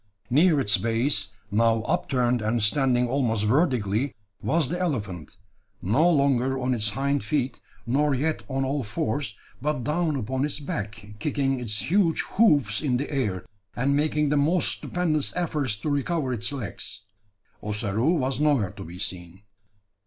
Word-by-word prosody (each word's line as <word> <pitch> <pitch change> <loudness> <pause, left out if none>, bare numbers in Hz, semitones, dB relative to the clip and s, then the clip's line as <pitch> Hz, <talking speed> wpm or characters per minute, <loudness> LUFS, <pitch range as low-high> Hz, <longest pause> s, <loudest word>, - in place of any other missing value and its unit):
Near 155 +3 +5
its 105 -5 +2
base, 115 +1 0 0.2
now 115 +1 +3
upturned 125 0 +1
and 110 +1 0
standing 125 +1 +3
almost 120 -5 0
vertically, 125 - +1 0.3
was 160 -5 +1
the 175 +2 -2
elephant, 105 - -3 0.4
no 135 - +3
longer 135 -4 +2
on 130 0 0
its 105 -3 0
hind 140 +3 -1
feet, 130 0 -1 0.2
nor 140 +4 +2
yet 155 +4 -1
on 135 0 0
all 140 +2 -1
fours, 110 +1 -2 0.2
but 145 -3 -1
down 155 +3 0
upon 130 +1 -2
its 150 0 -2
back, 110 -6 -5
kicking 135 -2 0
its 110 - -2
huge 185 -4 +3
hoofs 145 - +3
in 130 -5 +1
the 140 +4 -4
air, 105 -10 -1 0.3
and 135 +3 +1
making 150 0 +1
the 150 - +2
most 160 +6 +3
stupendous 160 -5 -1
efforts 150 -9 0
to 120 +8 -3
recover 145 -1 0
its 115 +2 -2
legs. 120 -6 -5 0.6
Ossaroo 105 - 0
was 130 -1 -1
nowhere 145 -10 +2
to 100 -1 -9
be 90 0 -9
seen! 90 0 -7
130 Hz, 150 wpm, -25 LUFS, 110-150 Hz, 0.6 s, Near